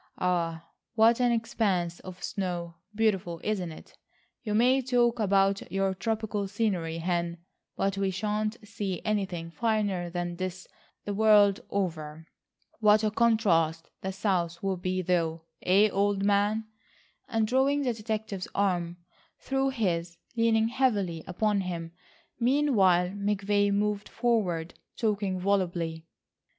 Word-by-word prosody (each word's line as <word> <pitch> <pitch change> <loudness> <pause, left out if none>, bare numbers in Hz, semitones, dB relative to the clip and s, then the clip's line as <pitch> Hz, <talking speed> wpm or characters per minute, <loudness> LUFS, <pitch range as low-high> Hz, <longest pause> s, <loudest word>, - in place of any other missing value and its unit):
Ah, 170 -2 -1 0.3
what 230 +1 +5
an 245 -1 +4
expanse 200 -7 0
of 185 -1 -10
snow. 175 -3 -3 0.2
Beautiful, 195 -6 0
isn't 190 -5 -1
it? 155 - -14 0.4
You 210 -2 -2
may 255 +4 +4
talk 240 -2 +2
about 195 -2 +2
your 195 0 +1
tropical 210 0 -2
scenery, 190 -6 -1
Hen, 170 0 -1 0.4
but 195 0 0
we 195 -1 +1
shan't 210 +3 -2
see 200 -4 -4
anything 190 -6 -2
finer 205 -4 0
than 175 0 -4
this 185 0 -4 0.4
the 205 - -2
world 205 -1 +5
over. 160 -5 -3 0.5
What 215 0 +5
a 215 - +2
contrast 185 -9 +2
the 190 - -3
south 180 -3 -1
will 195 -1 0
be 185 +1 -2
though, 165 -2 0 0.2
eh, 200 +4 +4
old 200 0 +1
man?" 205 +2 +2 0.6
and, 225 -2 +1
drawing 275 +4 +2
the 250 -3 +1
detective's 215 -3 -4
arm 175 -3 0 0.4
through 270 0 0
his, 175 -9 -1 0.2
leaning 225 -1 +3
heavily 205 -11 0
upon 200 +2 +1
him 170 -3 -5 0.5
meanwhile, 230 -9 +3
McVay 205 0 0
moved 205 0 0
forward, 195 -9 0 0.2
talking 200 -4 0
volubly. 175 -4 -1
200 Hz, 125 wpm, -28 LUFS, 175-220 Hz, 0.6 s, what